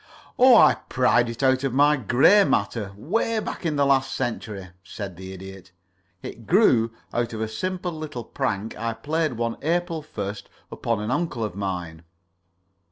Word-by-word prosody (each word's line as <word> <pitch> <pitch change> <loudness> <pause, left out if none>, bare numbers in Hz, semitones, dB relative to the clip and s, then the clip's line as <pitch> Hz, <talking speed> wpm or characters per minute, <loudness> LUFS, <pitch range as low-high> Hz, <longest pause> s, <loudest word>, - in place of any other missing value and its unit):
"Oh, 255 0 +8
I - - +7 0.2
pried 120 -2 +3
it 115 +3 -5
out 130 0 +3
of 135 -2 -1
my 145 +2 +5
gray 135 - +5
matter 110 - -1
'way 220 - -1
back 200 -4 -3
in 155 - -1
the 140 -1 +2
last 135 -1 +2
century," 105 -6 -4
said 95 0 -7
the 95 +2 -9
Idiot. 95 -1 -11 0.5
"It 115 - -9
grew 125 - +4 0.2
out 120 -1 -1
of 110 - -4
a 110 - -1
simple 180 +10 -3
little 155 -6 -6
prank 105 0 -3
I 115 +1 -3
played 155 +5 -1
one 115 0 -2
April 170 +1 -1
1st 100 -8 -6 0.3
upon 115 -3 -2
an 105 +3 -3
uncle 145 -5 -1
of 105 -4 -3
mine. 90 -5 -4
120 Hz, 165 wpm, -24 LUFS, 105-155 Hz, 0.5 s, Oh